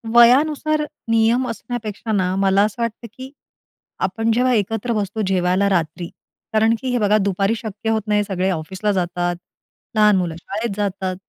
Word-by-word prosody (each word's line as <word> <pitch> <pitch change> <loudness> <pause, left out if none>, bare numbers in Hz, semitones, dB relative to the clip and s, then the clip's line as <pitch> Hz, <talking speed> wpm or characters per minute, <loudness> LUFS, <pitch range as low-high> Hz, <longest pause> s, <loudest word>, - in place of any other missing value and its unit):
वयानुसार 295 +6 +5 0.3
नियम 230 +3 +3
असण्यापेक्षा 225 -1 -5
ना, 185 -3 +1
मला 195 0 +3
असं 215 +3 -2
वाटतं 230 0 -3
की 260 +3 -10 0.8
आपण 225 +4 -1
जेव्हा 250 +2 +2
एकत्र 225 +2 -1
बसतो 210 0 -2
जेवायला 185 +1 +2
रात्री, 170 -1 -1 0.5
कारण 220 +1 +3
की 260 - -3
हे 245 - +1
बघा 210 0 +3
दुपारी 200 +1 0
शक्य 220 0 -5
होत 220 -1 +1
नाही. 210 0 +2
सगळे 190 -2 -1
ऑफिसला 190 +5 -2
जातात, 175 -2 -1 0.6
लहान 210 -1 +5
मुलं 175 -3 -2
शाळेत 210 +2 -4
जातात. 190 -2 -2
210 Hz, 155 wpm, -20 LUFS, 190-230 Hz, 0.8 s, वयानुसार